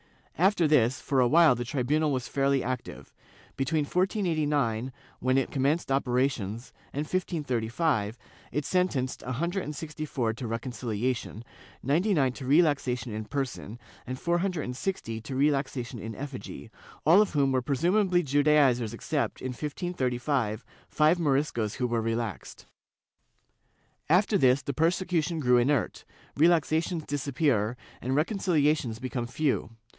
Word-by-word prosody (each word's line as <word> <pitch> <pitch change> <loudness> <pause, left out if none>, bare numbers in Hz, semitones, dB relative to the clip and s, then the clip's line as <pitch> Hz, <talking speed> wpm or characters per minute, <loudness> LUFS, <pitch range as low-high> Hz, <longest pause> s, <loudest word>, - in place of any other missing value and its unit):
After 180 -2 +3
this, 130 -4 +3
for 135 - 0
awhile 150 +4 +6
the 120 0 -3
tribunal 145 +4 0
was 130 -2 -2
fairly 140 0 +1
active. 130 -1 -5 0.4
Between 145 +3 0
1489, 150 - 0 0.3
when 130 +1 +2
it 135 - 0
commenced 140 +2 0
operations, 125 -4 -1 0.2
and 145 - -3
1535 145 - -1 0.3
it 150 +2 -2
sentenced 165 -9 0
a 130 - -4
hundred 170 +9 -1
and 150 - -6
sixty 155 +1 -6
four 120 -6 -1
to 115 +2 -6
reconciliation, 115 -1 -3 0.4
ninety 175 - +2
nine 135 -5 +2
to 130 0 -8
relaxation 135 -6 +2
in 110 0 -4
person, 125 -4 -4 0.3
and 130 +1 -4
four 170 0 +1
hundred 180 -4 -1
and 125 - -5
sixty 115 -9 -3
to 130 +4 -6
relaxation 135 -3 0
in 110 +1 -6
effigy, 130 -3 -8 0.3
all 170 +7 +7
of 210 - 0
whom 140 -3 +2
presumably 175 - +2
were 160 - -9
Judaizers 140 -5 +3
except, - - -2
in 130 - -4
1535, 130 - -2 0.2
five 155 +3 +3
Moriscos 135 -8 0
who 125 - -1
were 120 -1 0
relaxed.^ 115 -3 -4 1.4
After 195 +4 +3
this, 130 0 +4
persecution 165 +2 0
grew 125 -4 +4
inert, 130 0 0 0.3
relaxations 160 +1 +2
disappear 135 -5 0 0.2
and 130 +2 -1
reconciliations 150 - +1
become 125 -1 -4
few. 140 0 -1
140 Hz, 130 wpm, -28 LUFS, 125-155 Hz, 1.4 s, all